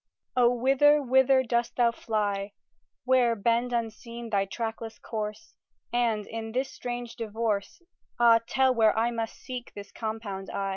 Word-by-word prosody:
O 245 -1 +5
whither, 270 +4 +4
whither 265 0 +4
dost 235 -1 -1
thou 240 -1 +3
fly, 205 -3 -2 0.5
Where 250 -2 +3
bend 235 +3 +1
unseen 235 0 -4
thy 200 -1 +2
trackless 225 +2 -5
course, 215 +5 -6 0.4
And 230 -4 +1
in 225 0 -6
this 265 +2 -1
strange 240 -1 -6
divorce, 225 - -3 0.4
Ah, 230 -1 +6
tell 260 0 +3
where 220 -2 +3
I 230 +2 +2
must 225 -1 -4
seek 250 -2 -8
this 200 -1 -9
compound 215 -4 -5
I? 195 0 -2
230 Hz, 145 wpm, -27 LUFS, 220-245 Hz, 0.5 s, Ah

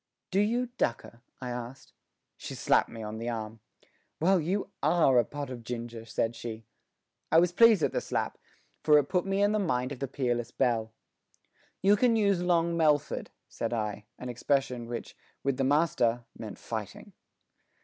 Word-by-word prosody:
"Do 190 - +2
you 235 +4 +1
dukker?" 115 0 -2 0.2
I 125 -1 -5
asked. 120 +2 -7 0.4
She - - -7
slapped - - +3
me 115 -1 -8
on 110 +1 -5
the 115 +1 -3
arm. 110 -1 -5 0.6
"Well, 185 +3 +4
you 195 +5 -2
are 145 -7 +4
a - - +4
pot 145 +3 -6
of 120 -2 -7
ginger!" 115 -1 -6
said 115 +1 -1
she. 115 -1 -7 0.7
I 160 - +6
was 175 +1 +5
pleased 220 -3 +6
at - - +2
the - - -1
slap, - - -2 0.4
for 150 -1 +6
it 145 - +5
put 180 0 +1
me 195 +1 +2
in 205 - +4
mind 155 -12 0
of 135 - -6
the 135 - -2
peerless 120 -3 -1
Belle. 115 -2 0 0.9
"You 200 +2 +6
can 230 +2 +3
use 200 -4 +2
Long 170 -1 +2
Melford," 150 -3 +1 0.2
said 115 0 -3
I, 105 -2 -3
an 125 - -6
expression 125 -1 -1
which, 120 0 -6 0.3
with 140 -2 0
the 135 - +1
master, 130 -5 +2
meant - - -8
fighting. - - -6
135 Hz, 170 wpm, -29 LUFS, 120-175 Hz, 0.9 s, I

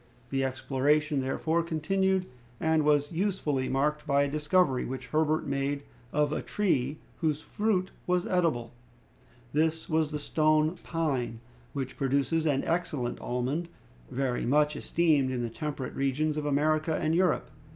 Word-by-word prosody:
The 135 -1 +1
exploration, 140 +3 +1
therefore, 160 +5 0
continued, 185 +4 +1 0.3
and 160 -1 +2
was 145 -1 +3
usefully 165 -7 0
marked 150 +3 0
by 140 0 +4
a - - +1
discovery 150 -1 +2
which 130 -1 -5
Herbert 155 0 +1
made 140 0 -1 0.3
of 150 0 +1
a - - -1
tree 150 -9 0 0.2
whose 155 -3 +1
fruit 205 -3 0 0.2
was 180 0 +2
edible. 160 -11 +1 0.8
This 160 +2 +1
was 160 -1 +1
the 150 - -3
stone 155 +1 +2
pine, 135 -9 -1 0.3
which 135 -2 -4
produces 140 +4 +1
an 140 -2 +2
excellent 165 -8 -1
almond, 130 +8 -2 0.4
very 130 -2 -1
much 150 +3 +3
esteemed 150 -4 +2
in 125 -2 -2
the 115 - -3
temperate 145 -1 -4
regions 145 +3 0
of 150 -1 -2
America 155 +2 +2
and 155 - 0
Europe. 180 +2 +2
150 Hz, 140 wpm, -29 LUFS, 135-160 Hz, 0.8 s, by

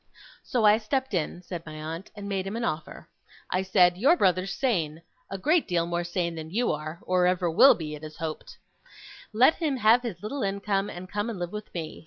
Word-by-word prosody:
'So 240 -4 0
I 210 +1 +6
stepped 265 +2 -2
in,' 175 +1 -2
said 175 -2 -6
my 155 -2 -9
aunt, 160 +4 -6
'and 205 -1 -7
made 195 -1 -2
him 200 - -4
an 230 - -3
offer. 155 -7 -4 0.4
I 185 - +1
said, 180 -2 +3
"Your 290 - +5
brother's 185 - +2
sane 170 - -1 0.3
a 195 - -4
great 310 - +2
deal 170 -2 +1
more 175 0 -2
sane 175 -1 -2
than 160 -1 -7
you 230 +7 0
are, 155 +2 -5
or 180 -1 +2
ever 180 -1 +1
will 265 +12 +7
be, 155 -2 -6
it 150 0 -9
is 155 0 -8
to - - -17
be 165 - -2
hoped. 155 -1 -7 0.7
Let 245 +8 +5
him 300 -5 -1
have 230 +1 +5
his 210 -8 -6
little 270 +6 -4
income, 200 0 -1
and 180 +1 -8
come 205 +3 -3
and 225 - -5
live 175 -1 -4
with 210 0 -7
me. 160 -2 -5
185 Hz, 230 wpm, -27 LUFS, 170-215 Hz, 0.7 s, will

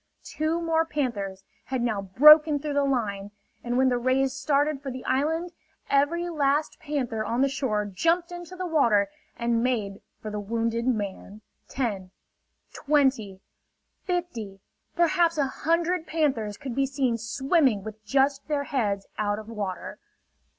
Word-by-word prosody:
Two 315 +2 -2
more 325 -1 +1
panthers 220 -12 -3 0.2
had 260 -2 -2
now 220 -4 0
broken 300 +10 +7
through 290 +1 -4
the 285 0 +2
line; 210 -7 -1 0.3
and 245 0 -1
when 260 0 +4
the 245 -1 0
rays 260 +2 +1
started 285 +1 0
for 280 - -5
the 255 0 -7
island, 320 +7 0 0.4
every 310 +5 +2
last 295 -2 0
panther 260 -8 -2
on 235 +3 -1
the 275 - +4
shore 260 -7 -1
jumped 335 - 0
into 350 +1 -8
the 370 0 -4
water 235 - +2 0.3
and 235 -1 0
made 210 -6 -1 0.2
for 215 - -6
the 210 - -3
wounded 230 +3 -2
man. 210 -2 -3 0.3
Ten, 205 -8 -3 0.6
twenty, 265 -10 +1 0.6
fifty, 295 - -4 0.4
perhaps 340 -1 +2
a 285 - +2
hundred 335 +5 0
panthers 265 -10 0
could 265 -4 -6
be 270 +2 +1
seen 265 -3 0
swimming 255 - +1
with 215 0 -9
just 270 +4 +1
their 295 -2 0
heads 210 -9 -1
out 205 -1 0
of 215 +1 -9
water. 205 -5 -5
265 Hz, 150 wpm, -26 LUFS, 215-300 Hz, 0.6 s, broken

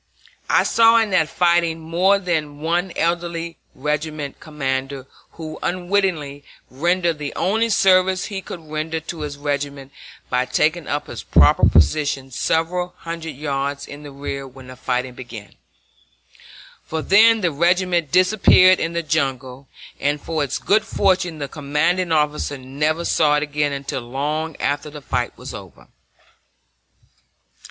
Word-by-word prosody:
I - - +4
saw 230 0 +5
in 225 -3 +2
that 160 -4 +2
fighting 170 -2 +2
more 175 +5 +2
than 155 -6 -2
one 175 +4 -1
elderly 170 0 -2 0.2
regimental 150 0 -3
commander 135 -2 -3 0.3
who 155 -1 -8
unwittingly 175 -6 -1 0.3
rendered 170 +3 0
the 145 -1 -5
only 225 +4 +1
service 190 -2 +3
he 200 -2 -5
could 175 - -8
render 155 +1 -2
to 160 0 -7
his 145 -1 -5
regiment 140 -1 -3 0.4
by 125 0 0
taking 155 +4 0
up 145 0 -2
his - - -7
proper - - +5
position 135 - +2
several 175 +6 -1
hundred 165 -2 -6
yards 140 0 -3
in 145 +1 -10
the 145 - -9
rear 140 0 -5
when 130 0 -13
the 130 - -9
fighting 125 0 -2
began; 120 -5 -10 1.3
for 160 -1 -4
then 225 +2 +5
the 175 -3 +1
regiment 175 0 +1
disappeared 185 0 +5
in 165 - -2
the 170 0 -2
jungle, 135 -3 -2 0.3
and 145 +1 0
for 155 0 -2
its 140 - -2
good 215 +2 +2
fortune 185 -4 +1
the 145 -2 -4
commanding 160 +5 0
officer 150 -2 0
never 150 +6 -2
saw 150 -2 +3
it 150 - +1
again 145 -1 -1
until 140 -1 -4
long 145 +6 -3
after 145 +1 -2
the 150 0 -9
fight 135 - -3
was - - -8
over. - - -12
155 Hz, 145 wpm, -21 LUFS, 140-175 Hz, 1.3 s, saw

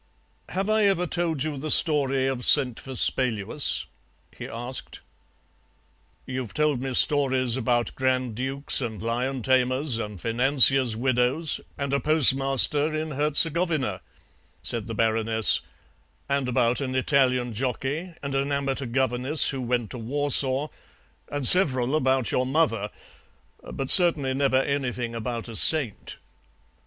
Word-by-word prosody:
"Have 195 +2 -4
I 215 -1 +1
ever 190 -3 0
told 165 -5 -3
you 155 -2 -5
the 155 +3 -6
story 135 -4 +4
of 135 -2 -4
Saint 130 -5 +5
Vespaluus?" 130 -1 +1 0.5
he - - -9
asked. 120 +3 -7 1.3
"You've 130 -4 -6
told 150 -4 -1
me 135 -1 -5
stories 130 -4 +2
about 120 -1 -2
grand 130 -2 -2
dukes 135 +5 -1
and 110 -4 -6
lion 125 +3 -4
tamers 130 0 0
and 105 -4 -7
financiers' 130 - +2
widows 130 +5 -1 0.2
and 140 -1 -4
a 140 - +1
postmaster 145 0 +3
in 155 0 -5
Herzegovina," 150 - +1 0.6
said 115 -2 -2
the 115 - -6
Baroness, 110 0 +2 0.7
"and 140 -2 -2
about 125 0 0
an 130 -1 -4
Italian 130 -3 0
jockey 135 - -5
and 140 -1 -5
an 135 +1 -2
amateur 140 -1 -3
governess 130 +4 0
who 135 -2 -5
went 120 -2 -3
to 125 - -8
Warsaw, 140 +3 0 0.6
and 145 -3 -1
several 135 -7 +3
about 130 -4 0
your 125 0 -1
mother, 130 -8 -1 0.8
but 135 -1 -2
certainly 160 -8 +4
never 135 -1 0
anything 125 -4 -4
about 115 0 -6
a 115 - -10
saint." 140 -4 +1
130 Hz, 130 wpm, -24 LUFS, 125-145 Hz, 1.3 s, Saint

